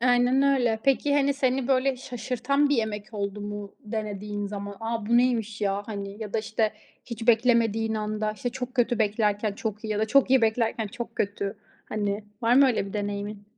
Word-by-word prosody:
Aynen 245 +2 +4
öyle. 250 -5 +3
Peki, 275 +1 +3
hani, 280 0 +3
seni 265 -1 0
böyle 265 0 +2
şaşırtan 250 +3 0
bir 285 - +2
yemek 215 -1 -3
oldu 200 0 -3
mu 205 -1 -6
denediğin 210 -2 -4
zaman? 200 0 -6
"A 225 -1 -3
bu 235 +1 +4
neymiş 225 -4 +1
ya?" 200 0 0
Hani 200 0 -6
ya 210 -2 -7
da - - +1
işte 220 0 0 0.3
hiç 230 -2 -6
beklemediğin 225 -2 +3
anda, 215 0 -2
işte 215 +4 -4
çok 250 +1 -6
kötü 240 -1 +2
beklerken, 210 -1 +1
çok 215 +1 -5
iyi - - -3
ya 210 - -1
da 220 - +1
çok 275 +2 +4
iyi 265 -3 +5
beklerken, 225 0 +1
çok 235 +3 -7
kötü. 200 -1 -2 0.3
Hani, 205 0 -2 0.2
var 230 +1 +4
mı 275 +1 +7
öyle 230 -5 +1
bir 195 - -8
deneyimin? 205 0 -4
220 Hz, 190 wpm, -26 LUFS, 205-245 Hz, 0.3 s, mı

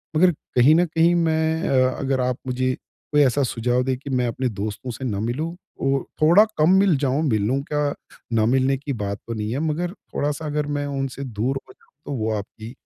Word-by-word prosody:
मगर 180 +3 +5 0.2
कहीं 130 +5 +6
न 175 +1 +4
कहीं 165 +1 +3
मैं 160 0 +1
अ, 130 -1 +4
अगर 135 -1 0
आप 125 0 0
मुझे 130 0 0
कोई 150 -1 -2
ऐसा 140 +1 +3
सुझाव 125 +1 0
दें 130 0 0
कि 140 +1 -9
मैं 125 -2 +1
अपने 125 +2 -1
दोस्तों 105 +4 -5
से 130 +3 -6
ना 100 -5 -2
मिलूँ 150 +10 -2 0.3
और 135 0 +1 0.2
थोड़ा 175 +8 +7
कम 155 +4 +4
मिल 190 -7 +4
जाऊँ, 140 +2 0
मिलूँ 110 +5 +1
क्या 150 -1 -1 0.4
ना 110 -1 +3
मिलने 130 +2 +2
की 140 0 -4
बात 100 0 -2
तो 115 - -3
नहीं 105 0 -3
है 135 - -1
मगर 175 +3 -2
थोड़ा-सा 150 -5 -4
अगर 150 0 -1
मैं 145 - -2
उनसे 135 -1 -3
दूर 125 +2 -2
हो - - -14
जाऊँ - - -31
तो 145 - -4
वो 110 0 0
आपकी 110 +3 -8
135 Hz, 210 wpm, -23 LUFS, 125-150 Hz, 0.4 s, थोड़ा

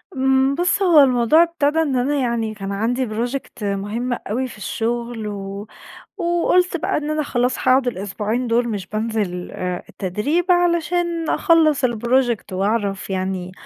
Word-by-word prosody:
امم 265 +1 +2
بُص 360 +3 +1
هو 345 -5 +6
الموضوع 255 +5 +4
ابتدى 320 -2 0
إن 280 -5 0
أنا، 265 +4 +1
يعني 235 -4 -1
كان 195 -1 -5
عندي 240 +5 -1
project 235 +1 -4
مهم 205 +5 -2
أوي 245 +3 -3
في 235 - -12
الشغل، 235 +1 -3
و 200 0 -6 0.5
وقُلت 345 +1 +1
بقى - - -1
إن 300 0 -2
أنا 305 0 0
خلاص 250 -2 0
هاقعد 255 0 +3
الأسبوعين 215 +2 -2
دول 235 +1 +1
مش 200 -4 -4
بانزل 215 -4 -3
آآ 180 -1 -4
التدريب، 210 - -1
علشان 345 -1 +1
أخلّص 315 -5 +3
الproject 240 -2 0
وأعرف 200 0 -1
يعني 185 -1 -3
240 Hz, 145 wpm, -20 LUFS, 210-295 Hz, 0.5 s, هو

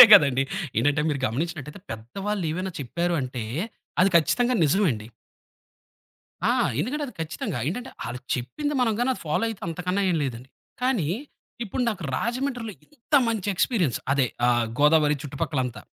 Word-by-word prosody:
అంతే - - +16
కదండీ! 140 -9 +8 0.4
ఏంటంటే, 145 +5 +2
మీరు 145 -3 0
గమనించినట్టైతే, 150 - -3
పెద్దవాళ్ళేమైనా 185 - -3
చెప్పారు 170 +7 -1
అంటే, 125 -2 -4 0.6
అది 185 - +6
ఖచ్చితంగా 245 +10 +3
నిజమండి. 145 - +2 1.4
ఆ! - - +5 0.3
ఎందుకంటే 290 - -1
అది 250 - -10
ఖచ్చితంగా. 160 - -3
ఏంటంటే 245 +8 -4 0.2
ఆళ్లు 120 +2 -5
చెప్పింది 290 - -3
మనం 230 -3 +3
గాని 245 +2 +2
అది - - -7
ఫాలో 155 +9 +1
అయితే 220 -3 -6
అంతకన్నా 180 +4 -1
ఏం 175 - +2
లేదండి. 125 0 -5 0.3
కానీ, 250 - +1 0.6
ఇప్పుడు 230 +4 -2
నాకు 205 -5 -3
రాజమండ్రిలో 245 - -2
ఎంత 295 0 -6
మంచి 215 -4 -1
ఎక్స్‌పీరియన్స్. 180 - +1
అదే 140 -2 +3 0.2
ఆహ్, 120 -1 +3
గోదావరి 150 0 +5
చుట్టుపక్కలంతా, 140 -4 -2
170 Hz, 140 wpm, -25 LUFS, 135-220 Hz, 1.4 s, అంతే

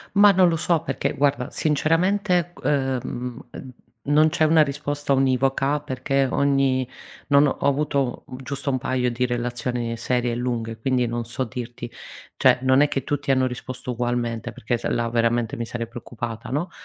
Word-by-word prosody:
Ma 205 0 +8
non 185 -1 +5
lo 165 - +1
so 165 0 +1
perché, 135 - -2
guarda, 140 -2 +1
sinceramente 175 +4 +1
g - - -15
uhm, 130 -3 -1
uhm, 130 - -9 0.4
non 155 +2 +5
c'è 160 0 +2
una 155 0 +5
risposta 145 0 -2
univoca 135 +2 +2
perché 135 -1 0
ogni 135 -2 +2 0.4
non 140 0 +5
ho 135 - -1
avuto 140 -2 0 0.2
giusto 140 +2 -3
un 130 - 0
paio 125 -1 0
di 125 +1 0
relazioni 120 -1 -2
serie 125 0 0
e - - -1
lunghe 115 -2 -3
quindi 125 +1 +1
non 120 0 -3
so 125 +3 -3
dirti. 120 -1 -7 0.5
Cioè - - +5
non 130 +1 +4
è 145 - +5
che 135 - -2
tutti 145 -1 -2
hanno 130 -1 +3
risposto 125 0 -6
ugualmente 120 -2 -2
perché 120 +3 -2
se - - -3
là 120 -1 0
veramente 115 0 +1
mi 115 - -3
sarei 115 0 -4
preoccupata, 115 -1 -7
no? 155 +7 -2
130 Hz, 170 wpm, -23 LUFS, 120-145 Hz, 0.5 s, Ma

